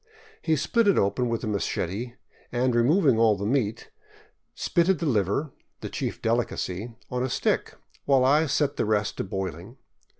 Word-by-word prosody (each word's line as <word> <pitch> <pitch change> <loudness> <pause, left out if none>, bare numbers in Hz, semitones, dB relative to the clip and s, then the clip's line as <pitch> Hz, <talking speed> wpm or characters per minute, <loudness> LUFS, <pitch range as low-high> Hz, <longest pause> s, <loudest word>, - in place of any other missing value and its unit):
He 160 - +1
split 220 - +1
it 200 - +4
open 100 +5 +1
with 115 -1 -2
a - - -2
machete 105 +3 -2 0.4
and, 125 +1 +1
removing 130 - +3
all 110 -3 +4
the 100 - -4
meat, 115 -2 -1 0.6
spitted 175 +1 +2
the 165 - -3
liver, 120 - 0 0.3
the - - -5
chief - - -4
delicacy, 115 -2 -2 0.2
on 125 0 -1
a 130 - -1
stick, - - -1 0.3
while 135 -2 +4
I 150 +4 +4
set 145 +1 0
the - - +1
rest 105 -1 0
to - - -1
boiling. 95 - -5
120 Hz, 165 wpm, -26 LUFS, 105-140 Hz, 0.6 s, it